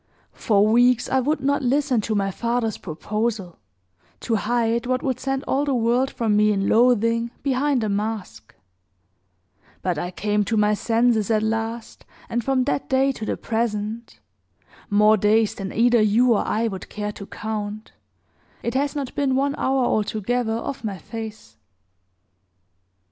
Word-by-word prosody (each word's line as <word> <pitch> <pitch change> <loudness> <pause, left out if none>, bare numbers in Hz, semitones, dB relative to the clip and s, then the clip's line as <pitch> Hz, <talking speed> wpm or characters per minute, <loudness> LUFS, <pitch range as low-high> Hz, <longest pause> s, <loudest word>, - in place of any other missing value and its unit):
For 205 -2 +2
weeks 245 +2 +3
I 265 - +2
would 285 +2 0
not 280 +1 +1
listen 265 -2 +1
to 215 +1 -2
my 195 -1 0
father's 235 +1 -2
proposal, 205 +2 -3 0.6
to 235 - -2
hide 235 +2 0
what 255 0 0
would 260 -2 -1
send 270 +1 -2
all 275 +2 0
the 280 -2 0
world 240 +3 +2
from 225 -5 0
me 210 0 +4
in 195 -1 0
loathing 230 0 +3
behind 275 -2 +1
a - - 0
mask; 210 0 -4 1.3
but 175 -4 -1
I 175 - -3
came 210 +3 0
to 220 - -1
my 210 0 +3
senses 225 0 +1
at 215 -1 +2
last, 225 +1 -3 0.3
and 240 0 -1
from 265 0 +1
that 275 +1 -2
day 270 +1 +3
to 220 -5 -6
the - - -2
present 225 0 -3 0.7
more 210 +1 +5
days 215 +2 +3
than 195 -1 -6
either 240 0 +3
you 230 +4 +4
or 210 - 0
I 225 +2 0
would 190 -4 -6
care 210 0 -4
to 200 -1 -10
count 215 0 -5 0.7
it 235 - -2
has 280 +2 0
not 275 -3 -4
been 280 -3 0
one 280 +1 +1
hour 265 -1 +1
altogether 220 +2 0
off 245 +3 -5
my 205 -3 -3
face." 220 +4 -9
225 Hz, 160 wpm, -23 LUFS, 210-250 Hz, 1.3 s, more